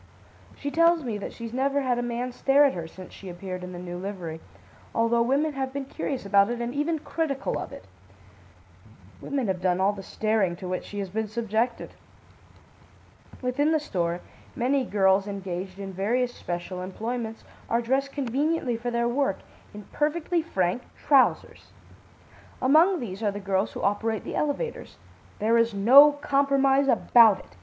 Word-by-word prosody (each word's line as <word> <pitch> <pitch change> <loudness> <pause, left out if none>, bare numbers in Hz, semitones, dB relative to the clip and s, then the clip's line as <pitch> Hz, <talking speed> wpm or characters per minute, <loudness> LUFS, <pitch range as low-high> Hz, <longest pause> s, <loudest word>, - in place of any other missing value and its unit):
She 285 - -4
tells 335 0 +4
me 225 -5 -3
that - - -6
she's 230 -1 -8
never 275 +2 +1
had 250 -2 0
a - - 0
man 240 +1 -3
stare 275 +3 +4
at 275 - +2
her 170 -2 -5
since 185 +2 -12
she 195 - -10
appeared 185 +1 -6
in 180 - -7
the 180 - -7
new 175 0 -6
livery, 180 -5 -6 0.5
although 230 +1 +2
women 280 +6 +1
have 265 -1 -3
been 275 0 -4
curious 265 -2 -4
about 200 +1 +4
it 240 0 -3
and 240 +1 -3
even 300 +3 0
critical 300 -3 -2
of - - -6
it. - - -11 1.4
Women 275 -3 -2
have 190 -3 -2
done 180 -1 +1
all 195 +2 +3
the 200 - -8
staring 210 -2 0
to 180 +1 -8
which 185 0 -3
she 205 - -8
has 195 -2 -3
been 220 +2 -2
subjected. 225 +2 -2 1.5
"Within 285 +5 +1
the 315 - +3
store, 175 - -2 0.3
many 260 +2 +1
girls 195 -2 +2
engaged 190 -1 -5
in 195 -1 -7
various 240 +6 0
special 175 -1 -5
employments, 225 +4 -5 0.3
are 230 - +2
dressed 265 +4 0
conveniently 275 -1 -1
for 240 +1 -3
their 235 0 0
work, 255 -4 0 0.3
in 210 0 -10
perfectly 330 +3 0
frank 190 - -1 0.2
trousers. 275 -3 +2 0.9
Among 325 +8 +4
these 200 -3 -6
are 210 - +1
the 205 0 -5
girls 195 0 -1
who - - -6
operate 215 +2 0
the - - -6
elevators. 305 - -3 0.4
There 230 +2 +2
is 230 -2 +1
no 265 +9 +8
compromise 275 -1 +2
about 230 -5 +6
it. 90 - -16
235 Hz, 170 wpm, -26 LUFS, 195-275 Hz, 1.5 s, no